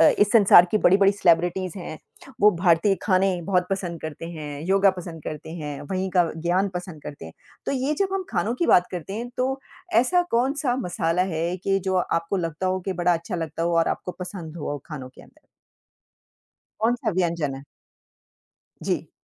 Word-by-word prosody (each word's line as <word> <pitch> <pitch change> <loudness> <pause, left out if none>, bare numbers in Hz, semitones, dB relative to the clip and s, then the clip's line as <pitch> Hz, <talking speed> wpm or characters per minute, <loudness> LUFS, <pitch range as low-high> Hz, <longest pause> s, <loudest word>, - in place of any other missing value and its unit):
अ, - - +8
इस 205 0 +4
संसार 200 -5 +8
की 215 - +2
बड़ी-बड़ी 195 +1 +5
सेलिब्रिटीस 180 -1 +2
हैं 170 -4 -7 0.4
वो 210 - +7
भारतीय 175 +2 +3
खाने 185 -2 +2
बहुत 180 0 +1
पसंद 180 -4 -3
करते 155 +1 -7
हैं, 150 -3 -7
योगा 195 +1 +4
पसंद 165 -3 -8
करते 155 +1 -6
हैं, 150 -4 -6
वहीं 190 0 -1
का 175 -2 +2
ज्ञान 175 +4 +1
पसंद 180 -4 -6
करते 145 - -8
हैं। 80 - -11 0.3
तो - - 0
ये 275 +3 0
जब 395 -1 +2
हम 385 -1 -2
खानों 205 +4 0
की 335 +7 0
बात 180 - +5
करते 180 +1 -6
हैं, 235 +3 -4
तो 265 +1 -1 0.4
ऐसा 355 +8 +2
कौन-सा 260 +2 +1
मसाला 175 -5 0
है 170 +3 -1
कि 195 +1 0
जो 190 -1 0
आपको 170 +1 0
लगता 165 0 -2
हो 185 0 0
कि 190 +1 -3
बड़ा 175 0 +2
अच्छा 170 +3 -3
लगता 165 -1 -4
हो 170 0 +1
और 165 - +3
आपको 180 - -3
पसंद 175 -3 -7
हो 145 -2 -4
खानों 140 -5 -7
के 130 - -16
अंदर? - - -21 1.4
कौन-सा 235 +2 +1
व्यंजन 170 -6 0
है? 135 - -9 1.2
जी। - - -2
180 Hz, 185 wpm, -24 LUFS, 165-200 Hz, 1.4 s, अ